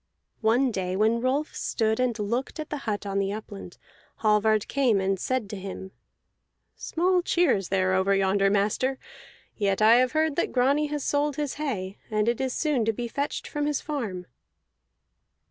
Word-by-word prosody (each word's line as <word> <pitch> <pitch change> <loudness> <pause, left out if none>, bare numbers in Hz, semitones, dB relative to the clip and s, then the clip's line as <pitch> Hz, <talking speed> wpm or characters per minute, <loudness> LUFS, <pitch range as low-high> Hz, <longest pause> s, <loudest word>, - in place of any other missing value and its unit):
One 240 +4 +3
day 185 -3 -2
when 220 +3 +2
Rolf 275 +5 -1
stood 220 0 0
and 250 -3 +1
looked 235 +8 -3
at 310 - -6
the 300 - -2
hut 205 0 -2
on 195 0 -1
the 195 0 0
upland, 205 -3 -8 0.5
Hallvard 215 0 +3
came 260 -7 +2
to 190 - 0
him 190 - 0
and 195 - -1
said, 195 -6 -4 0.8
"Small 360 +2 +1
cheer 350 -3 +2
is 195 -3 -4
there 185 -1 +1
over 190 +1 +2
yonder, 195 +1 +2
master; 210 +7 +1 0.6
yet 200 -2 0
I 220 +2 +7
have 255 +2 +2
heard 315 -2 +1
that - - 0
Grani 275 +4 +2
has 295 -1 -3
sold 290 0 0
his 295 -2 -2
hay, 200 -9 -3
and 215 0 0
it 235 +2 +1
is 260 -1 -1
soon 290 -4 0
to 225 - +2
be 240 +2 -4
fetched 285 +4 -3
from 295 0 -2
his 295 -2 0
farm." 220 - -4
225 Hz, 180 wpm, -26 LUFS, 200-280 Hz, 0.8 s, I